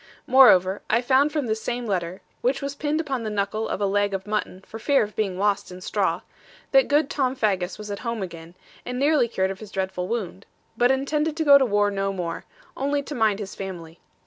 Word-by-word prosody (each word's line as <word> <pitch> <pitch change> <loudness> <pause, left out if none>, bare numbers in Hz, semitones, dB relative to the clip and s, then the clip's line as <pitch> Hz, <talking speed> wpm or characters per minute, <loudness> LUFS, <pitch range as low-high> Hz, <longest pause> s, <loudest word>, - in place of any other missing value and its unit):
Moreover, 205 -8 +6
I 230 - +3
found 275 +4 +3
from 295 -3 -1
this 220 -1 -2
same 245 0 -3
letter 185 -3 -3 0.2
(which 265 +3 +1
was 280 0 -4
pinned 295 +2 -1
upon 275 -6 -2
the 220 - -3
knuckle 210 +1 -2
of - - -2
a 205 - +1
leg 200 0 +1
of 190 0 -5
mutton, 210 -3 -3
for 225 - -9
fear 280 +2 +3
of 210 0 -7
being 195 -4 -1
lost 200 -1 0
in 180 - -9
straw) 185 - -1 0.5
that 270 -1 +5
good 295 0 +3
Tom 265 -2 -1
Faggus 190 -6 -1
was 210 -1 -7
at 200 - -4
home 230 -4 -3
again, 170 -1 -9 0.3
and 250 0 -5
nearly 285 -2 +3
cured 190 -4 -1
of 195 - -8
his 215 - -10
dreadful 190 -2 -3
wound; 200 -4 -4 0.3
but 240 +2 +3
intended 300 +4 0
to 320 - 0
go 280 -1 +8
to 265 - +3
war 205 -1 +2
no 195 0 -1
more, 175 -3 -5 0.3
only 285 +1 -1
to 295 - -7
mind 220 -6 +2
his 200 -2 -6
family. 175 -4 -8
215 Hz, 225 wpm, -24 LUFS, 195-265 Hz, 0.5 s, go